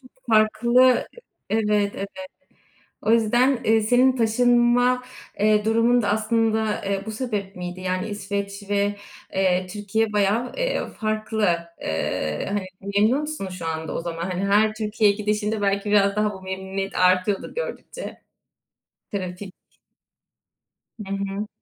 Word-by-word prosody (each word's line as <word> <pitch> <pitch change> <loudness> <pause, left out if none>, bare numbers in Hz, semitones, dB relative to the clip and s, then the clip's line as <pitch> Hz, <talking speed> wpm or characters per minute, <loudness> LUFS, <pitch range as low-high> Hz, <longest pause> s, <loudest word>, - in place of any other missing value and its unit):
çok 255 -2 -18 0.2
farklı 235 +4 +4 0.4
Evet, 210 -2 +1
evet. 195 - -4 0.9
O 215 - +1
yüzden, 240 +3 +3
eee, 220 0 +4
senin 250 +4 +4
taşınma, 245 +2 +3 0.4
eee, 210 0 +3
durumun 230 +2 +3
da 205 - -1
aslında, 220 0 +1
eee, 195 0 -1
bu 220 - -4
sebep 210 -4 -4
miydi? 180 0 -6
Yani, 185 +2 -2
İsveç 200 0 -4
ve, 205 0 +1 0.4
eee, 185 -1 +1
Türkiye 210 +2 -1
bayağı, 210 +4 +1
eee, - - -1
farklı. 215 -1 -1 0.3
Eee, 80 -1 -2
hani, 200 -2 -2 0.3
memnun 220 +7 +4
musun 300 -11 -4
şu 180 -2 -7
anda 160 0 -3
o - - -2
zaman? 165 -1 -5
Hani, 185 +2 -2
her 215 +2 +3
Türkiye'ye 215 -1 +1
gidişinde 210 0 -1
belki 200 +1 0
biraz 200 -1 +4
daha 210 0 +1
bu 190 - -10
memnuniyet 190 +1 -4
artıyordur 185 +2 +2
gördükçe. - - -6 0.9
Trafik 185 0 -5 1.5
Hı 195 - -3
hı. 195 +1 -3
210 Hz, 130 wpm, -23 LUFS, 195-225 Hz, 1.5 s, farklı